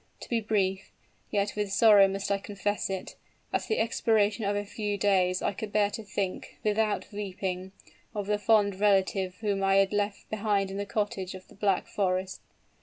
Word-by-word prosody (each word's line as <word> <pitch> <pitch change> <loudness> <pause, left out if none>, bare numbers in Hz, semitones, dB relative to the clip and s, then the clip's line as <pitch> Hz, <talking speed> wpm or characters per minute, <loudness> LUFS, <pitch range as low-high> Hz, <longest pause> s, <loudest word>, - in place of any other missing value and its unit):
To - - -9
be 230 -2 +1
brief, 195 -3 -1 0.4
yet 205 -1 0
with 205 -2 -2
sorrow 205 -1 +7
must 195 +1 -3
I 200 - +2
confess 205 +1 -2
it, 190 -1 -5 0.4
at - - -1
the 440 - 0
expiration 220 -2 +2
of 200 +1 +1
a 205 0 -2
few 205 0 -3
days 185 -3 +2
I - - 0
could 210 +1 -6
bear 205 -1 +2
to 225 - -5
think, 195 -2 -4
without 215 0 0
weeping, 190 -2 -4 0.4
of 205 -1 -2
the 210 +1 0
fond 205 -2 +3
relative 195 -2 +2
whom 200 -3 0
I 195 0 +3
had 195 0 +3
left 205 0 -1
behind 205 -2 0
in 195 - -5
the 200 0 -3
cottage 200 -3 -2
of 185 - -12
the - - -15
Black 195 -2 +1
Forest! 185 -1 -1
200 Hz, 185 wpm, -28 LUFS, 195-210 Hz, 0.4 s, sorrow